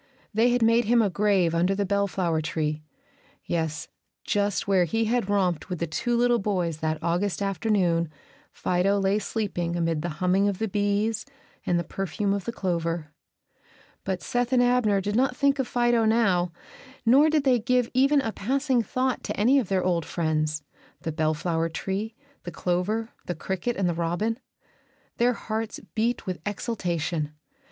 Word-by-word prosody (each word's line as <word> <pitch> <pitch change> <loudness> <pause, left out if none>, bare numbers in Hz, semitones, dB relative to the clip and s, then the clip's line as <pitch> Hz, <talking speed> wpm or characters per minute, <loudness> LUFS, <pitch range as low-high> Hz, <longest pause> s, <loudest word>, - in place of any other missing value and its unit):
They 225 +3 +4
had 245 -1 +2
made 230 +1 +4
him 235 +2 +4
a 200 - 0
grave 195 -4 +2
under 180 +4 +2
the 200 0 0
bellflower 190 -4 0
tree, 155 0 -2 0.6
yes, 160 -2 -2 0.4
just 205 -1 0
where 190 -3 +4
he 225 +7 0
had 230 -2 0
romped 185 -4 0
with 180 - -2
the 170 - -1
two 200 +10 -1
little 240 0 +3
boys 180 -6 -1
that 155 0 -1
August 175 +4 0
afternoon 190 -4 +1 0.4
Fido 185 +3 +1
lay 195 +2 +2
sleeping 185 -6 -2
amid 165 -2 0
the 175 - -2
humming 190 +2 +2
of 200 -2 -1
the 220 - -1
bees 205 +2 0 0.4
and 175 - +2
the 170 - 0
perfume 195 +4 -2
of 200 -1 -3
the 235 - -2
clover. 170 -6 -2 0.9
But 190 -2 -3
Seth 245 0 -1
and 250 -1 +4
Abner 245 -5 +3
did 205 +2 -2
not 250 +1 +2
think 280 -1 +2
of 265 - 0
Fido 240 -1 +2
now, 195 -6 +2 0.5
nor 275 +7 +6
did 305 -2 +2
they 255 -3 +4
give 250 +1 +1
even 275 +3 +4
a 225 - -2
passing 260 +4 0
thought 255 +2 -1
to - - -4
any 255 +7 +5
of 255 - -2
their 190 -2 +1
old 175 -2 +1
friends, 155 -2 -1 0.4
the 160 - -3
bellflower 160 +1 0
tree, 200 +6 -3 0.3
the - - -6
clover, 185 +6 -1 0.2
the 175 - -2
cricket, 190 +8 -3
and 190 -2 +1
the 175 - +1
robin. 175 +8 -1 0.8
Their 245 +1 +3
hearts 220 -1 -4
beat 230 +2 0
with 185 -2 -3
exultation. 170 -8 -2
200 Hz, 170 wpm, -26 LUFS, 175-230 Hz, 0.9 s, nor